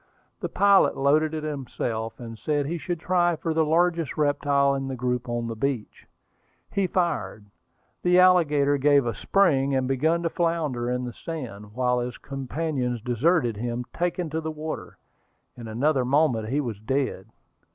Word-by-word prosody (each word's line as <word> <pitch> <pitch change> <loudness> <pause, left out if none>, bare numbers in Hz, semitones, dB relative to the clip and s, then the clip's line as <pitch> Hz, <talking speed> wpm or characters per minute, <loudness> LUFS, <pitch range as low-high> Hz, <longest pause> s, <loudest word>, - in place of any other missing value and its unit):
The - - -3
pilot 200 -1 +4
loaded 150 +3 +2
it 155 - -4
himself, 120 -6 -4
and 115 -2 -7
said 145 +4 -1
he 170 +4 -3
should 175 +1 -3
try 175 0 +2
for 160 +1 -2
the 160 0 +3
largest 165 0 +1
reptile 145 -1 +2
in 135 -1 -3
the 135 - -3
group 125 0 -2
on 120 0 -2
the 115 -1 -4
beach. 125 -1 -3 0.6
He 195 -2 +1
fired. 170 - -1 0.6
The 180 0 +3
alligator 150 -6 +4
gave 140 -1 +4
a 115 - -1
spring, 140 - +2
and 130 -1 +1
began 160 +6 +1
to 165 - +1
flounder 155 -8 -1
in 125 0 -1
the 120 - -6
sand, 115 -12 -7
while 125 0 +1
his 120 0 -4
companions 135 -2 -3
deserted 125 - +1
him, 120 +2 -3
taking 175 -1 -2
to 160 +1 -2
the 160 - -4
water. 155 0 -6 0.6
In 120 -2 -9
another 130 +5 +1
moment 125 -5 +2
he 140 +4 +1
was 115 -7 -5
dead. 125 -4 -2
140 Hz, 165 wpm, -25 LUFS, 125-160 Hz, 0.6 s, pilot